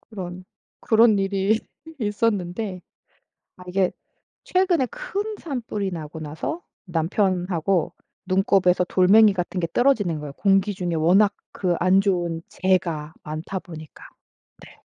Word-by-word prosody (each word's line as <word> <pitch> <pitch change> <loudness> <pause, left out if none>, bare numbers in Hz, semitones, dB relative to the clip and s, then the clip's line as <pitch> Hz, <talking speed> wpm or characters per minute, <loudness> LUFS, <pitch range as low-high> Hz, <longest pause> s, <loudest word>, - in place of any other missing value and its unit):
그런 185 -4 -8 0.4
그런 220 -2 +4
일이 195 +2 +1 0.4
있었는데 205 -3 -1 0.8
아 180 - -13
이게 185 0 +1 0.5
최근에 365 -8 +2
큰 435 - -4
산불이 225 - -4
나고 160 -2 -7
나서 155 - -5 0.2
남편하고 180 0 0 0.3
눈곱에서 185 -1 +3
돌멩이 200 +4 +5
같은 180 0 -3
게 170 - -1
떨어지는 215 - +2
거예요. 145 -2 -7
공기 195 +4 +2
중에 180 -3 -3
워낙 190 +6 +4 0.2
그 180 -3 -1
안 185 +2 +4
좋은 175 -4 -1
재가 170 -5 0
많다 155 +5 -5
보니까. 155 -4 -12 0.6
네. - - -18
190 Hz, 255 characters per minute, -23 LUFS, 175-210 Hz, 0.8 s, 돌멩이